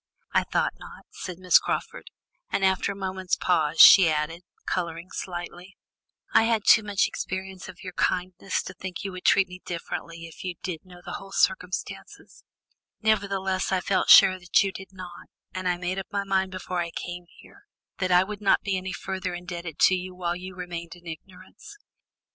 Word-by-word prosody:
"I - - +3
thought - - 0
not," - - -12
said 180 -2 -7
Miss 185 0 +5
Crawford, 485 +2 -4 0.4
and 195 - +1
after 190 +1 +1
a - - -6
moment's 190 -1 -2
pause 160 -3 +1
she 185 -1 +10
added, 155 +2 -2 0.2
colouring 170 0 -3
slightly: 175 +1 -7 0.6
"I - - +7
have 230 - +2
had 215 -2 0
too 215 - +7
much 205 -2 +1
experience 190 0 -6
of 180 -1 -12
your 180 -1 -7
kindness 185 +2 -1
to 185 - -8
think 185 0 -7
that - - -8
you 195 - -4
would 185 0 -9
treat 195 -1 +5
me 180 0 -11
differently 170 -1 -6
if 165 - -11
you 180 -1 -4
did 180 -2 -5
know 180 -1 -14
the - - -5
whole 195 0 -12
circumstances; 185 -1 -2 0.6
nevertheless, 195 -4 0
I 190 - +2
felt 190 +1 0
sure 190 -2 +8
that 180 +1 +3
you 195 - -1
did 190 0 -10
not, 185 -2 -10 0.3
and 185 0 -3
I 175 -1 +1
made 180 +2 -3
up 190 - -6
my 200 0 -1
mind 190 -1 0
before 185 -1 -4
I 170 -1 -2
came 175 +1 -7
here, - - -18 0.3
that 185 -1 0
I 180 +1 +6
would 210 +1 -7
not 200 - +3
be 195 -2 0
any 185 0 -5
further 185 -1 -4
indebted 175 -3 -7
to - - +5
you 185 0 -3
while 175 -1 -2
you 185 +1 -8
remained 175 -2 -6
in 175 0 -19
ignorance. 185 - -11
185 Hz, 195 wpm, -26 LUFS, 175-190 Hz, 0.6 s, she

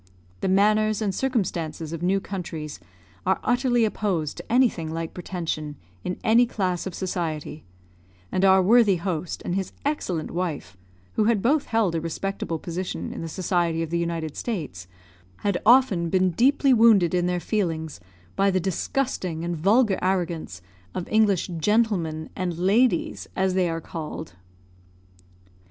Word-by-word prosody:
The - - -1
manners 215 +2 +3
and 205 -3 -1
circumstances 170 - -2
of 165 - -5
new 190 +3 +2
countries 170 -6 -6 0.4
are 190 +1 +1
utterly 245 -2 +2
opposed 185 -8 -1
to - - -9
anything 230 -11 +2
like 165 0 -4
pretension 165 -5 -4 0.3
in 180 - -3
any 235 +2 +5
class 185 -5 -2
of 185 - -6
society; 160 -5 -4 0.7
and 185 - 0
our 190 -1 +6
worthy 215 0 +5
host, 170 -1 -3
and 175 - -2
his 190 -1 -2
excellent 185 - -2
wife 160 - -3 0.4
who 215 - +2
had 220 -3 +2
both 285 +4 +2
held 225 -6 +1
a 165 - -1
respectable 165 +1 -3
position 175 +3 -4
in - - -6
the 165 - -5
society 170 -2 0
of 165 - -6
the 170 - +1
United 165 -3 -3
States 150 - -4 0.5
had 200 -3 0
often 225 -9 +5
been 185 +1 +2
deeply 265 - +3
wounded 220 -7 +5
in 180 -1 +2
their 180 0 0
feelings 165 - -2 0.4
by 195 0 +3
the 185 -1 +1
disgusting 185 - -2
and 175 0 -2
vulgar 200 +5 +3
arrogance 170 - -2 0.3
of 180 - -3
English 210 -5 +3
gentleman 180 -6 +1
and 180 -3 -3
ladies, 245 - +2
as 190 0 +1
they 185 -2 +2
are 165 0 -3
called. 160 -1 -7
185 Hz, 150 wpm, -25 LUFS, 165-215 Hz, 0.7 s, our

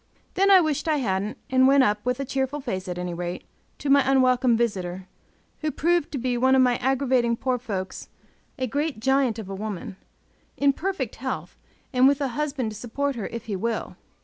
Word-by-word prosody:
Then 390 +2 +3
I 380 -2 +8
wished 310 -1 -1
I 310 -1 +2
hadn't, 205 -4 -1
and 260 0 +5
went 275 0 +6
up, 210 -2 +1
with 250 +1 -1
a 275 - -2
cheerful 270 +2 -2
face 190 -10 -4
at 180 -1 -4
any 180 -1 -3
rate, 175 +1 -4 0.3
to 290 - -6
my 280 0 +6
unwelcome 255 -2 +3
visitor, 190 -5 -2 0.5
who 310 - -1
proved 340 +1 +1
to 285 - -3
be 250 -1 -1
one 260 +1 +4
of 260 - +5
my 245 -1 +3
aggravating 255 -2 +1
poor 255 0 -1
folks 195 -6 -5 0.5
a 260 - -1
great 285 +1 -2
giant 265 -1 +2
of 220 -4 -6
a 195 - -6
woman, 205 0 -5 0.6
in 280 0 +3
perfect 385 +6 -3
health, - - -5 0.4
and 255 +1 +5
with 280 0 +3
a 280 -2 -1
husband 270 -3 -2
to - - -9
support 275 +5 -2
her 220 -4 -4
if 235 -1 -7
he 210 -3 -3
will. 225 +4 -3
255 Hz, 200 wpm, -25 LUFS, 215-275 Hz, 0.6 s, I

